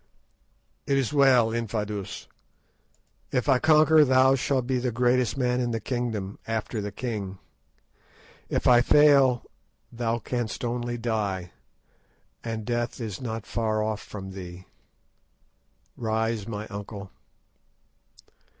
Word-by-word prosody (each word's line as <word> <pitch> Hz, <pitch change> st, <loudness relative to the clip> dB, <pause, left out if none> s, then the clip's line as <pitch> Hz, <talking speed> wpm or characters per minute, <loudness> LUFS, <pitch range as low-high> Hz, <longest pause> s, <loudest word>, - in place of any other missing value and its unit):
"It 140 Hz, -, +2 dB
is 135 Hz, 0 st, 0 dB
well, 130 Hz, -5 st, +5 dB
Infadoos; 105 Hz, -3 st, -4 dB, 1.0 s
if 125 Hz, -, 0 dB
I 130 Hz, -3 st, +4 dB
conquer, 155 Hz, +1 st, +6 dB
thou 130 Hz, -1 st, +5 dB
shalt 135 Hz, -1 st, 0 dB
be 130 Hz, 0 st, 0 dB
the 125 Hz, 0 st, -1 dB
greatest 125 Hz, +2 st, +1 dB
man 125 Hz, -1 st, +1 dB
in 120 Hz, -, -1 dB
the 115 Hz, -1 st, -1 dB
kingdom 110 Hz, -4 st, -3 dB
after 110 Hz, 0 st, -2 dB
its 105 Hz, -1 st, -5 dB
king. 105 Hz, -6 st, -4 dB, 1.1 s
If -, -, -1 dB
I 120 Hz, -1 st, +7 dB
fail, 135 Hz, -2 st, +5 dB, 0.5 s
thou 115 Hz, -1 st, -1 dB
canst 120 Hz, 0 st, -3 dB
only 120 Hz, 0 st, -2 dB
die, 105 Hz, -6 st, -2 dB, 0.9 s
and 110 Hz, -2 st, -4 dB
death 120 Hz, 0 st, -2 dB
is 110 Hz, -3 st, -5 dB
not 115 Hz, -3 st, -4 dB
far 110 Hz, -2 st, -1 dB
off 110 Hz, -1 st, -2 dB
from 95 Hz, -2 st, -8 dB
thee. 90 Hz, -1 st, -9 dB, 1.3 s
Rise, 110 Hz, -2 st, -1 dB
my 105 Hz, -2 st, -5 dB
uncle." 100 Hz, -1 st, -7 dB
115 Hz, 120 wpm, -26 LUFS, 105-125 Hz, 1.3 s, I